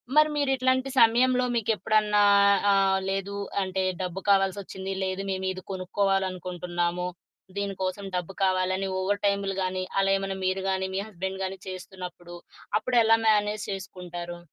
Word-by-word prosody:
మరి 305 0 +6
మీరిట్లాంటి 260 -2 +1
సమయంలో 250 +2 +5
మీకెప్పుడన్నా 215 -1 +2 0.5
ఆహ్, 195 -1 +3
లేదు 195 +1 -2 0.3
అంటే, 190 0 -1 0.2
డబ్బు 180 0 -3
కావాల్సొచ్చింది, 195 -1 +1
లేదు 190 +1 -2
మేమీది 190 -1 -2
కొనుక్కోవాలనుకుంటున్నాము, 180 -2 -1 0.5
దీని 200 -1 -2
కోసం 185 +2 -3
డబ్బు 180 +1 -3
కావాలని 185 0 +1
ఓవర్ 200 +2 -1
టైములు 200 -1 +1
గానీ, 185 0 -2 0.2
అలా 195 0 +2
ఏమన్నా 195 0 -3
మీరు 190 +1 0
గానీ, 190 0 0
మీ 195 - 0
హస్బెండ్ 190 -1 -5
గానీ 190 0 -4
చేస్తున్నప్పుడు, 180 -2 -8 0.4
అప్పుడెలా 225 -1 +4
మేనేజ్ 210 -1 +2
చేసుకుంటారు? 175 -3 -7
195 Hz, 125 wpm, -27 LUFS, 185-205 Hz, 0.5 s, మరి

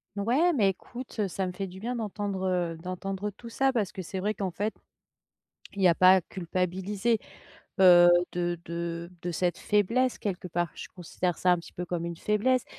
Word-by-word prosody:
Ouais, 255 - +2
mais 210 -9 +3
écoute, 240 +5 -8
heu, 205 - +2
ça 190 +1 -2
me 180 - -3
fait 195 +2 -4
du 190 +2 -11
bien 245 +2 -3
d'entendre, 205 -3 -3
heu, 175 -3 -1
d'entendre 190 +4 -4
tout 235 +4 -11
ça 270 +3 +1
parce 215 -6 0
que 190 - -6
c'est 185 +2 -5
vrai 210 +2 0
qu'en 195 -2 -2
fait, 205 +5 -2 1.0
il 200 - -3
y - - +6
a 170 - +6
pas 185 +2 +7
à - - +3
culpabiliser, 190 +5 -1 0.6
heu, 175 -1 +8 0.2
de 175 -1 -1
de 170 0 -4
de 175 - -2
cette 175 +1 0
faiblesse 230 +5 +1
quelque 185 -3 -4
part. 175 0 -1
Je - - -8
considère 180 0 -2
ça 180 - +4
un 175 - +2
petit 170 - -11
peu 180 - -5
comme 170 -1 -3
une 170 -1 -5
faiblesse. 225 +7 +1
190 Hz, 200 wpm, -28 LUFS, 175-210 Hz, 1.0 s, heu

